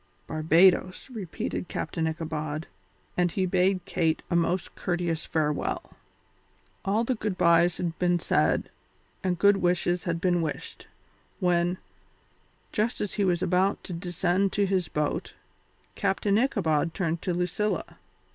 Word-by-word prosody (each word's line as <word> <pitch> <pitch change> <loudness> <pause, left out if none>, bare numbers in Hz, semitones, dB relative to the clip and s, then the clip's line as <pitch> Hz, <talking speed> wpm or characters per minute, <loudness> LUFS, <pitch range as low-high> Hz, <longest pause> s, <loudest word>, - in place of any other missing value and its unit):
"Barbadoes," 175 - +3
repeated 185 -4 -4
Captain 165 -2 -2
Ichabod, 155 -1 -3 0.5
and 180 0 +2
he 190 +1 0
bade 185 0 +1
Kate 160 -2 0
a - - +2
most 170 +1 0
courteous 175 -3 -2
farewell. 150 -2 -1 0.9
All 205 +4 +1
the 255 - 0
good 215 -5 -3
byes 170 0 +4
had 170 -2 -3
been 175 -1 +3
said 170 - +1 0.5
and 180 -2 0
good 200 +2 +5
wishes 175 -1 +1
had 170 -1 -1
been 175 -1 +2
wished, 155 -2 -5 0.5
when, 175 0 +2 0.9
just 220 +3 0
as 205 - -2
he 205 - 0
was 180 -2 +1
about 190 +3 +1
to 185 - -6
descend 180 +2 0
to 205 - +2
his 185 -3 0
boat, 150 -1 -2 0.6
Captain 200 +1 +1
Ichabod 165 - +1
turned 165 -3 -1
to 185 - -1
Lucilla. 180 +4 -2
180 Hz, 135 wpm, -27 LUFS, 165-190 Hz, 0.9 s, good